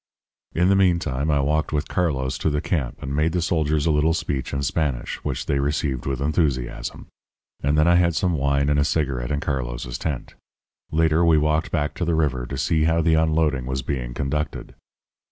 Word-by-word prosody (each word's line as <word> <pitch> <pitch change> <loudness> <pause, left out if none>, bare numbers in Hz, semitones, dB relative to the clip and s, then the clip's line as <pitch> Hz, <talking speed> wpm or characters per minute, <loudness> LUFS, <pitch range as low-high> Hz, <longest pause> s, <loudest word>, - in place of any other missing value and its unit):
"In 90 +3 +3
the 100 - +5
meantime 85 -7 +1
I 75 -2 +3
walked 75 +2 0
with 75 0 -1
Carlos 65 -7 -1
to - - +1
the 75 0 0
camp 75 -6 -2
and 70 +1 -3
made 80 +2 +1
the 90 - +1
soldiers 80 -4 +1
a 80 - +3
little 75 +2 +2
speech 70 -6 -3
in 70 0 -2
Spanish, 70 -2 -1
which - - -3
they 70 - 0
received 70 -2 -1
with 70 -1 -2
enthusiasm; 70 -6 -1 0.6
and 70 +2 +1
then 75 +2 +4
I 85 0 +5
had 85 -2 +2
some 90 +1 +1
wine 70 -1 +1
and 75 0 +2
a - - +4
cigarette 70 -5 -1
in 75 -1 -1
Carlos's - - -3
tent. 75 -6 -4 0.6
Later 80 +1 +3
we 85 -2 +5
walked 75 +1 +1
back 75 -3 -1
to 90 - -4
the 85 -1 +1
river 65 -6 0
to 70 - -5
see 80 +2 +1
how 80 0 +2
the 80 0 +3
unloading 80 -5 +1
was 65 0 -2
being - - -3
conducted. 75 +1 -3
75 Hz, 200 wpm, -23 LUFS, 70-80 Hz, 0.6 s, the